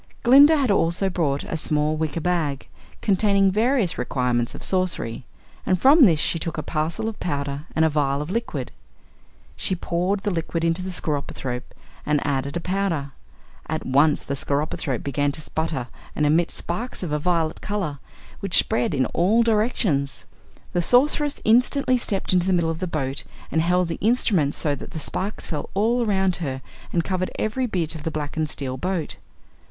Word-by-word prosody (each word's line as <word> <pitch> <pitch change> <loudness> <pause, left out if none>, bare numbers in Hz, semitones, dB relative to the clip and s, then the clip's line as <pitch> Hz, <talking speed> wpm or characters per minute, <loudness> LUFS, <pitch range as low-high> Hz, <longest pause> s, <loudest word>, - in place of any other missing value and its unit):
Glinda 285 +6 +7
had 265 -6 +2
also 190 +1 +2
brought 145 -6 0
a - - -4
small 150 0 +1
wicker 160 +1 -2
bag, 155 -5 -1 0.4
containing 200 -1 +3
various 220 -2 +1
requirements 125 -1 0
of - - -7
sorcery, 180 -11 -1 0.4
and 185 -1 +1
from 280 - +7
this 165 -7 +4
she 165 - +1
took 165 +1 -4
a - - -2
parcel 160 +7 -2
of 225 - -5
powder 140 -2 -3
and 160 - +4
a - - +4
vial 140 -2 0
of 150 +4 -4
liquid. 230 +3 -3 0.8
She 190 - -1
poured 180 +3 -1
the 205 - -1
liquid 165 -1 -2
into 165 +2 +1
the 185 - -4
skeropythrope 140 -7 -4 0.3
and 150 -1 0
added 140 -1 -1
the - - 0
powder. 180 -7 -1 0.6
At 160 0 -3
once 145 +3 +3
the 140 - -3
skeropythrope 140 -2 -2
began 145 0 0
to 155 - -7
sputter 160 -4 -3 0.3
and 150 - +1
emit 165 +3 +3
sparks 220 +5 -5
of 170 - -3
a 150 - 0
violet 165 -1 0
color, 190 -9 -3 0.4
which 195 -3 +2
spread 125 +5 +1
in 130 -1 +2
all 205 - +2
directions. 210 - 0 0.5
The 175 - +2
Sorceress 285 - +3
instantly 250 +3 +3
stepped 195 -5 0
into 180 0 +3
the 190 - +3
middle 170 -2 +2
of 160 - -5
the 185 - -2
boat 140 -4 -2 0.3
and 160 - +2
held 180 +1 +2
the 165 - -4
instrument 200 - +2
so 150 - 0
that 140 - -7
the 160 - -7
sparks 190 +7 -3
fell 150 -4 -3
all 230 +5 +2
around 190 -4 +1
her 130 -6 -4 0.3
and 170 - +1
covered 185 0 -1
every 250 +4 -1
bit 170 -7 -2
of 160 - -8
the 160 - -2
blackened 155 0 -3
steel 130 -3 -3
boat. 180 +2 -3
165 Hz, 180 wpm, -23 LUFS, 145-195 Hz, 0.8 s, Glinda